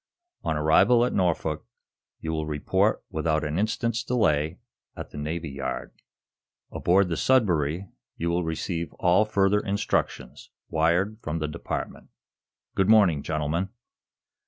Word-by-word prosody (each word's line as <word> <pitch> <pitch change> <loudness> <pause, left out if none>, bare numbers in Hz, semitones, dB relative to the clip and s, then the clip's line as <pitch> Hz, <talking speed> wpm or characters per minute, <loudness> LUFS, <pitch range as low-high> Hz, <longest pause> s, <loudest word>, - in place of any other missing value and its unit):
On 80 - 0
arrival 100 +11 +5
at - - -2
Norfolk 90 -4 0 0.6
you 80 - -3
will 80 -1 -2
report 75 -1 +1
without 80 -1 0
an 75 +3 -1
instant's 115 +2 0
delay 80 -10 +1 0.4
at - - -8
the - - -9
Navy 80 +1 -4
Yard. 70 -1 -4 0.8
Aboard 95 +2 +3
the 85 - -1
'Sudbury' 90 - +2 0.3
you 85 +1 -1
will 85 +1 0
receive 80 +1 -3
all 90 +4 +3
further 100 -1 +2
instructions, 100 -10 -2 0.2
wired 85 +7 +1
from 80 +1 -3
this 75 -1 -3
Department. - - -5 0.6
Good 95 +1 +1
morning, 100 -9 +5
gentlemen." 80 +5 -1
85 Hz, 130 wpm, -26 LUFS, 75-100 Hz, 0.8 s, arrival